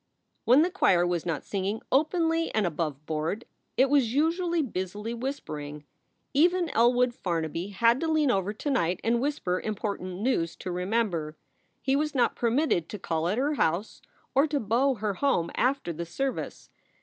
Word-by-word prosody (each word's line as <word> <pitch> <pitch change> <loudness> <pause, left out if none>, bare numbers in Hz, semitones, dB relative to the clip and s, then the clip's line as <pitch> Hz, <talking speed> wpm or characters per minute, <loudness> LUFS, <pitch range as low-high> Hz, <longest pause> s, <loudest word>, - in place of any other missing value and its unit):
When 260 +6 +6
the 360 - 0
choir 180 - +3
was 175 -1 -1
not 160 -4 -2
singing 200 +2 -2
openly 330 +3 +2
and 215 -2 +2
aboveboard, 155 - -2 0.3
it 265 - +5
was 265 -4 +2
usually 335 +2 +1
busily 210 0 -4
whispering. 150 - -5 0.5
Even 345 +4 +3
Elwood 245 +1 +3
Farnaby 165 -2 -2
had 230 +5 +3
to 330 - -1
lean 310 -4 +3
over 195 -2 0
to 215 +7 -4
night 180 -9 +1
and 235 +1 +2
whisper 250 -11 -1
important 200 -4 -4
news 210 -9 0
to 185 - -6
Remember. 180 -4 -1 0.5
He 270 0 +2
was 300 0 -1
not 250 - +2
permitted 235 - +1
to 210 - -5
call 165 -3 -2
at 200 +5 0
her 285 +4 +1
house 185 - -1 0.3
or 275 +4 +4
to 295 -1 0
beau 250 +5 +2
her 210 -2 -2
home 185 -7 +1
after 255 -8 0
the 170 +2 -5
service. 270 +10 -4
225 Hz, 160 wpm, -27 LUFS, 175-275 Hz, 0.5 s, When